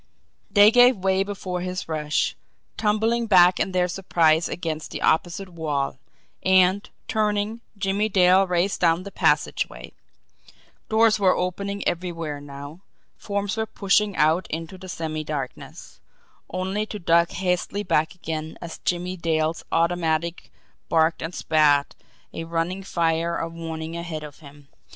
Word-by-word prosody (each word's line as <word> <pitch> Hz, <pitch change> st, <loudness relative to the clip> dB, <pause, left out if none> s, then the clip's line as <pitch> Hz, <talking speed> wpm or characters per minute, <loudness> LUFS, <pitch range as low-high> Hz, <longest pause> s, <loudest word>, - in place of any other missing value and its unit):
They 205 Hz, +1 st, +7 dB
gave 245 Hz, 0 st, +6 dB
way 190 Hz, 0 st, +1 dB
before 190 Hz, -3 st, -4 dB
his 185 Hz, 0 st, -4 dB
rush, 155 Hz, -2 st, -1 dB, 0.4 s
tumbling 225 Hz, +2 st, +1 dB
back 180 Hz, -3 st, +6 dB
in 195 Hz, -, 0 dB
their 180 Hz, -1 st, +1 dB
surprise 170 Hz, -3 st, +2 dB
against 160 Hz, -3 st, -4 dB
the -, -, -5 dB
opposite 175 Hz, +4 st, 0 dB
wall; 150 Hz, -6 st, -3 dB, 0.4 s
and, 190 Hz, +1 st, +3 dB, 0.2 s
turning, 215 Hz, +1 st, 0 dB, 0.2 s
Jimmie 200 Hz, +2 st, 0 dB
Dale 185 Hz, 0 st, +5 dB
raced 180 Hz, +2 st, 0 dB
down 170 Hz, 0 st, +3 dB
the 200 Hz, -, -8 dB
passageway. 150 Hz, -, 0 dB, 1.0 s
Doors 220 Hz, 0 st, +4 dB
were 190 Hz, -2 st, +4 dB
opening 200 Hz, +3 st, -3 dB
everywhere 165 Hz, -4 st, -3 dB
now, 145 Hz, +4 st, -10 dB, 0.3 s
forms 200 Hz, +1 st, -3 dB
were 220 Hz, 0 st, -1 dB
pushing 205 Hz, 0 st, +1 dB
out 160 Hz, +4 st, +2 dB
into 165 Hz, +4 st, -5 dB
the 185 Hz, 0 st, -11 dB
semi 155 Hz, -2 st, -4 dB
darkness 145 Hz, -4 st, -7 dB, 0.5 s
only 190 Hz, +4 st, -2 dB
to 210 Hz, -, -6 dB
duck 170 Hz, -2 st, +3 dB
hastily 185 Hz, +2 st, -1 dB
back 165 Hz, -2 st, +1 dB
again, 160 Hz, -3 st, -5 dB
as 170 Hz, -2 st, -8 dB
Jimmie 180 Hz, +1 st, -2 dB
Dale's 160 Hz, -1 st, -1 dB
automatic 170 Hz, 0 st, 0 dB, 0.4 s
barked 160 Hz, 0 st, +2 dB
and 165 Hz, +2 st, -5 dB
spat 145 Hz, -2 st, +3 dB, 0.4 s
a 165 Hz, -, -5 dB
running 170 Hz, +3 st, -2 dB
fire 170 Hz, -2 st, 0 dB
of 165 Hz, 0 st, -4 dB
warning 165 Hz, -1 st, -6 dB
ahead 170 Hz, -2 st, -5 dB
of 150 Hz, -2 st, -10 dB
him. 145 Hz, -2 st, -15 dB
175 Hz, 135 wpm, -24 LUFS, 160-195 Hz, 1.0 s, They